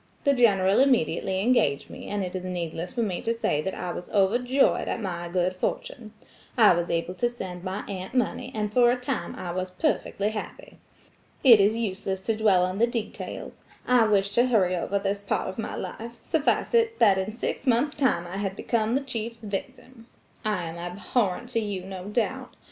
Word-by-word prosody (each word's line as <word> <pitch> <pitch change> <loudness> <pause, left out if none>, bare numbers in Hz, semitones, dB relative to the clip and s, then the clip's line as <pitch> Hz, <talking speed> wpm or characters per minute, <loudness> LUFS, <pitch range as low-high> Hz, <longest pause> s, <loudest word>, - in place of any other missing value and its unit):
The 280 - +4
General 200 -6 +4
immediately 240 -7 +2
engaged 195 - +2
me, - - -9
and 205 -1 -2
it 180 0 -5
is 185 - -4
needless 175 -1 -4
for 235 - -1
me 185 -5 -2
to 230 +1 -1
say 150 -9 0
that 190 +4 -3
I 180 - -4
was 175 - -7
overjoyed 245 +7 +2
at - - -2
my 175 -5 -4
good 180 +1 0
fortune. 215 +3 -4 0.5
I 220 -3 +7
was 170 0 -1
able 170 +2 -1
to 240 +6 0
send 185 -7 -7
my 190 +2 -4
aunt 190 +4 -6
money, 250 -3 0
and 210 -1 -2
for 240 0 +5
a 245 - +3
time 250 0 -4
I 175 - -5
was 185 +1 -3
perfectly 205 - -1
happy. 215 - -8 0.6
It 240 -6 +9
is 210 +3 +3
useless 190 -3 -3
to 225 - +1
dwell 200 -5 +4
on 185 +2 -3
the 235 - +4
details–I 235 +1 -2
wish 200 -1 +2
to 240 +3 +4
hurry 190 -7 +3
over 185 +3 -1
this 200 0 -1
part 200 - -1
of 190 +4 -6
my 225 - -3
life–suffice 235 - -2
it 455 -1 +3
that 200 -4 +5
in 190 +3 -2
six 235 +4 -4
months 255 +5 +3
time 260 - +1
I 175 +2 -6
had 195 -1 -2
become 225 +1 0
the 275 - +1
chief's 230 -3 -5
victim. 225 +4 -7 0.4
I 210 -5 -1
am 165 0 -6
abhorrent 195 +5 -1
to 235 - 0
you, 205 -4 -3
no 190 -1 -7
doubt. 215 +3 -2
205 Hz, 195 wpm, -26 LUFS, 185-235 Hz, 0.6 s, It